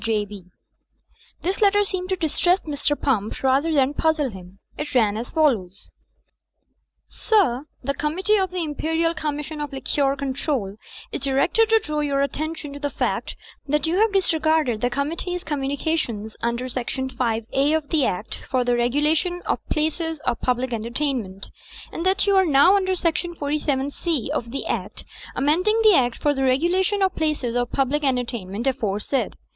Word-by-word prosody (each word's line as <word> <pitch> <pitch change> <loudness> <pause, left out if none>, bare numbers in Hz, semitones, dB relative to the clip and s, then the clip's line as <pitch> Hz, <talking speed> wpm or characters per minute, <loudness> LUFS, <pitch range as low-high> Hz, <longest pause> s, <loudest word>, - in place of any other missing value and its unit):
J. 215 -2 0
B." 200 -3 -11 1.0
This 375 +4 -1
letter 410 0 +5
seemed 370 -2 -3
to 380 - +1
distress 355 +2 +1
Mr. 290 -1 -1
Pump 220 -6 -1
rather 270 +5 +3
than 280 -2 +3
puzzle 305 -3 +1
him. 185 -1 -12 0.2
It 295 -2 -5
ran 215 -4 +3
as 230 +3 -4
follows: 220 - 0 1.2
"Sir— 310 - +1 0.2
"The 280 +2 0
Committee 355 +9 +1
of 380 -2 +1
the 360 -1 -3
Imperial 320 +2 0
Commission 300 -1 -4
of 295 - -4
Liquor 275 0 0
Control 265 -6 -2 0.4
is - - -4
directed 275 +12 +2
to 450 - +6
draw 305 -9 -2
your 280 -2 +1
attention 305 0 -4
to 285 - -8
the 285 0 -2
fact - - -2 0.3
that 300 +1 +1
you 340 +4 +1
have 440 0 +4
disregarded 315 - +2
the 245 - +2
Committee's 330 +7 -3
communications 275 -6 -2
under 235 +2 -1
section 255 +1 -3
5A 255 +5 0
of 300 -2 -8
the 310 -4 +2
Act 200 -1 -2
for 255 -2 +2
the 245 0 +2
Regulation 300 +9 +1
of - - -1
Places 320 +1 -1
of 235 - -1
Public 250 0 0
Entertainment; 230 -4 -3 0.4
and 335 - -4
that 385 +2 +2
you 400 -1 +3
are 380 - +5
now 300 +6 +6
under 375 -1 +1
Section 345 0 -1
47C 285 -1 -1
of 285 -6 -2
the 275 +4 -4
Act - - -3 0.3
amending 360 +11 +2
the 430 -2 +7
Act 245 -4 +2
for 290 - +1
the 270 - -3
Regulation 355 +9 +2
of 380 -1 +1
Places 300 -7 -1
of 245 -1 0
Public 275 +2 0
Entertainment 235 -5 -1
aforesaid. 250 -1 -1
285 Hz, 160 wpm, -23 LUFS, 250-325 Hz, 1.2 s, the